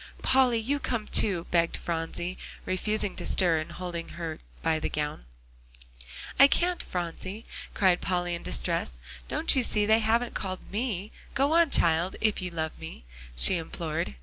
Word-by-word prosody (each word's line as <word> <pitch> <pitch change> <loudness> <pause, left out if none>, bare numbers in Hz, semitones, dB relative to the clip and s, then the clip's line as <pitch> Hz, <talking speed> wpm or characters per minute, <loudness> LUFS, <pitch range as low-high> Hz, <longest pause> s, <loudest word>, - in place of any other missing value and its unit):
"Polly, 255 -3 +4
you 265 +6 -1
come 235 -6 -2
too," 190 -6 +2
begged 170 -1 +2
Phronsie, 170 +2 -3 0.3
refusing 205 +2 0
to - - -3
stir, 170 -4 +5
and 155 - -6
holding 175 -2 -5
her 165 -2 -4 0.2
by 160 -1 +2
the - - -2
gown. 150 - -3 1.1
"I 275 - +10
can't, 350 +4 +1
Phronsie," 185 +5 -5 0.3
cried 185 -3 +3
Polly 175 -2 -1
in 170 - -4
distress; - - -1 0.3
"don't 310 0 +1
you 260 - +3
see 210 -3 +2
they 220 +1 +5
haven't 230 +2 +1
called 185 -2 -5
me. 210 -2 -2 0.2
Go 275 +3 +2
on, 335 -1 +5
child, 170 -4 +2
if 215 -3 +1
you 180 - -3
love 160 -2 -4
me," 160 - -9 0.3
she 175 - +4
implored. 160 - -3
185 Hz, 160 wpm, -28 LUFS, 165-220 Hz, 1.1 s, I